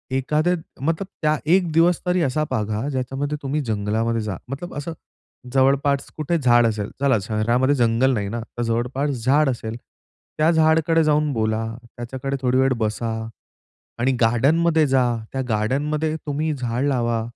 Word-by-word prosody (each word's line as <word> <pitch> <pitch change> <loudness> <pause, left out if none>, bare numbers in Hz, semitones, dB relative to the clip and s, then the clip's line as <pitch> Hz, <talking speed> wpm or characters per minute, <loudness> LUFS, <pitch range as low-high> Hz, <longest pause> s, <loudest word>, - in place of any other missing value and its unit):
एखादे 150 +6 +1 0.3
मतलब 165 +6 -1
त्या 155 -1 +2
एक 180 -2 +3
दिवस 170 +2 +4
तरी 180 0 +1
असा 150 +3 0
बघा 110 +1 -1
ज्याच्यामध्ये 135 +2 -3
तुम्ही 145 +3 -1
जंगलामध्ये 110 +1 -1
जा. 105 -2 -4
मतलब 150 +6 -6
असं 155 +3 -4 0.6
जवळपास 140 +1 +2
कुठे 160 +3 0
झाड 120 -3 +4
असेल, 105 -2 -2
चला 135 -4 +3
शहरामध्ये 115 +6 +1
जंगल 120 +1 +2
नाही 100 -4 -2
ना 120 - -3 0.2
तर 120 - -1
जवळपास 120 +5 -1 0.2
झाड 140 +2 +4
असेल, 115 -2 -4 0.6
त्या 155 +2 +3
झाडकडे 160 0 +3
जाऊन 150 -1 +2
बोला, 110 -1 0 0.3
त्याच्याकडे 130 +3 -4
थोडी 125 0 +2
वेळ 130 0 +3
बसा 110 +1 -2 0.9
आणि 130 +2 +2
गार्डनमध्ये 155 +8 +3
जा. 130 -1 +3 0.3
त्या 135 - -1
गार्डनमध्ये 145 +8 0
तुम्ही 150 +2 -1
झाडं 125 0 -2
लावा. 120 -4 0
135 Hz, 150 wpm, -22 LUFS, 115-150 Hz, 0.9 s, दिवस